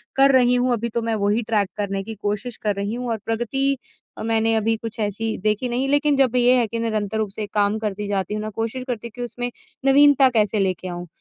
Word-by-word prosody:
कर 275 0 +6
रही 250 -1 +5
हूँ, 250 +1 +2
अभी 235 +1 -2
तो 235 +1 -2
मैं 225 -1 -1
वही 210 +3 +2
ट्रैक 210 -3 +1
करने 195 -1 -2
की 225 +2 -7
कोशिश 210 +4 -3
कर 210 -2 -1
रही 200 +2 -3
हूँ, 245 0 -4
और 225 - 0
प्रगति 270 +5 0 0.5
मैंने 225 0 +2
अभी 225 +1 +1
कुछ 225 0 -7
ऐसी 220 +2 -2
देखी 215 +4 +1
नहीं 255 +3 -1
लेकिन 290 +1 +3
जब 255 -2 +3
ये 245 +1 +5
है 235 - +1
कि, 230 +1 -4
निरंतर 215 -2 -1
रूप 215 -2 -1
से 210 +1 -5
काम 205 0 +2
करती 210 -1 -3
जाती 195 -1 -2
हूँ 210 - -2
ना 215 - -3
कोशिश 225 +4 -4
करती 235 -2 -4
हूँ 230 - -13
कि 245 - -6
उसमें 245 0 -4 0.3
नवीनता 275 -1 +6
कैसे 215 -3 +1
लेके 185 -1 -1
आऊँ 175 0 -6
225 Hz, 235 wpm, -22 LUFS, 210-245 Hz, 0.5 s, कर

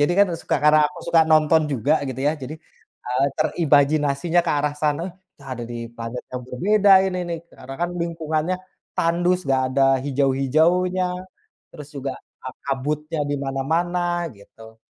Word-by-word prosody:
Jadi 145 +4 +3
kan 200 - +7
suka, - - 0
karena 150 0 +6
aku 180 - -12
suka 165 - +5
nonton 155 0 +5
juga 140 +4 +2
gitu 130 -1 -5
ya, - - +2
jadi, 140 +1 -7 0.5
eee, 125 +2 +1
terimajinasinya 155 +1 +2
ke - - +2
arah 145 0 -1
sana, 150 +1 +1 0.3
"Entah 140 -1 -14
ada 120 - -7
di - - -5 0.2
planet 115 +1 -6
yang 125 0 -4
berbeda 200 +10 +3
ini 185 -1 -2
nih," 170 - -3 0.2
karena 135 +1 -9
kan 175 - 0
lingkungannya 165 +1 -2 0.4
tandus, 175 +2 +2
nggak 135 -1 +2
ada 135 - +3 0.2
hijau-hijaunya, 150 +7 +2 0.7
terus 150 -4 -11
juga 135 -1 -3 0.3
a - - -2 0.2
kabutnya 150 +3 -2
di 145 - 0
mana-mana 175 +6 -1
gitu. 110 +2 -16
150 Hz, 155 wpm, -22 LUFS, 135-170 Hz, 0.7 s, kan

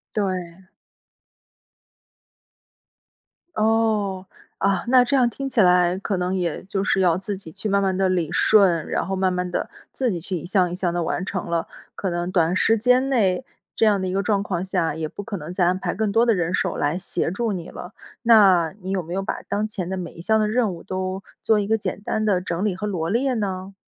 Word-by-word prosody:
对。 185 -3 -3 2.9
哦。 215 -3 +1 0.3
啊， 195 -3 +1
那 250 0 +6
这 275 +3 0
样 245 -2 +4
听 275 +3 -5
起 250 - -1
来， 180 -1 +4
可 200 0 -2
能 180 +1 -1
也 175 -4 -2
就 195 0 -3
是 195 - +1
要 175 -2 +3
自 195 +2 -4
己 165 -4 -11
去 215 - -5
慢 200 0 +2
慢 190 -1 +1
地 190 0 +2
理 175 -3 0
顺， 185 -8 +4
然 - - -1
后 190 - -3
慢 190 -1 +1
慢 180 0 -2
地， - - -2 0.2
自 255 -3 -1
己 175 - -3
去 185 +1 -3
一 160 - -7
项 180 -1 +2
一 - - -3
项 180 -2 -1
地 175 -1 -1
完 175 - -2
成 185 -2 -4
了， 170 0 -1 0.3
可 190 - -3
能 175 +1 -2
短 170 -1 +2
时 225 +4 +3
间 250 +4 +3
内 215 -3 +1 0.3
这 - - +3
样 205 -3 +3
的 190 - -2
一 185 - -3
个 195 +1 0
状 205 -2 +1
况 185 -3 -2
下， 175 -5 -1
也 160 -1 -3
不 - - -7
可 205 +1 -6
能 160 +3 -7
再 180 -1 +2
安 180 +1 +2
排 - - -3
更 215 0 -1
多 230 +3 +4
的 235 - +4
人 175 -3 -1
手 185 - -1
来 145 +4 0
协 180 -2 -2
助 220 +5 -2
你 175 -4 -5
了。 175 - -9 0.3
那 195 -8 +5
你 190 - -5
有 190 -2 -1
没 170 +2 -7
有 195 - -1
把 195 - -4
当 210 +1 -2
前 185 -5 -5
的 190 - -3
每 175 -2 -6
一 170 - -10
项 220 +5 +2
的 215 - +2
任 220 -2 +1
务， 170 - -9
都 185 0 -3 0.2
做 220 -1 +3
一 200 - -2
个 220 +1 +2
简 205 - -4
单 215 +1 -2
的 200 -4 +2
整 175 0 -3
理 195 - 0
和 210 +3 -4
罗 170 -4 -2
列 255 +5 +1
呢？ 195 -3 -3
190 Hz, 245 characters per minute, -23 LUFS, 180-210 Hz, 2.9 s, 那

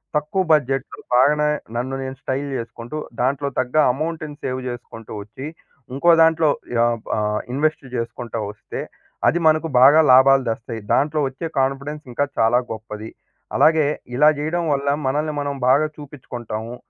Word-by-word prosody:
తక్కువ 150 +6 0
బడ్జెట్‌లో 135 -3 +1 0.2
బాగనే 150 +4 +4 0.3
నన్ను 130 +3 -2
నేను 130 0 -5
స్టైల్ 135 +2 -2
చేసుకుంటూ 115 +4 -7 0.2
దాంట్లో 140 +2 0
తగ్గ 130 +2 -2 0.2
అమౌంట్‌ని 155 +1 -4
సేవ్ 130 0 -2
చేసుకుంటూ 115 -2 -9
వచ్చి 110 +7 -9 0.5
ఇంకో 170 +6 +4
దాంట్లో 160 -1 +3 0.3
యాపా 115 -1 0
ఆహ్ 105 0 0
ఇన్‌వెస్ట్ 150 +1 0
చేసుకుంటా 115 0 -4
వస్తే 105 - -7 0.5
అది 175 - +3
మనకు 155 +1 +3
బాగా 145 +4 +8
లాభాలు 135 +1 +6
తెస్తయి. 115 0 -5
దాంట్లో 150 +2 +2
వచ్చే 135 +5 -6
కాన్‌ఫిడెన్స్ 140 +3 -2
ఇంకా 145 - +1
చాలా 115 +2 +4
గొప్పది. 110 0 -7 0.5
అలాగే 155 -2 +5 0.3
ఇలా 150 +4 +6
చేయడం 165 +4 -1
వల్ల 140 0 -2 0.2
మనల్ని 150 +3 0
మనం 145 0 -3
బాగా 140 +4 +4
చూపిచ్చుకుంటాము. 120 -5 -7
135 Hz, 140 wpm, -21 LUFS, 120-150 Hz, 0.5 s, బాగా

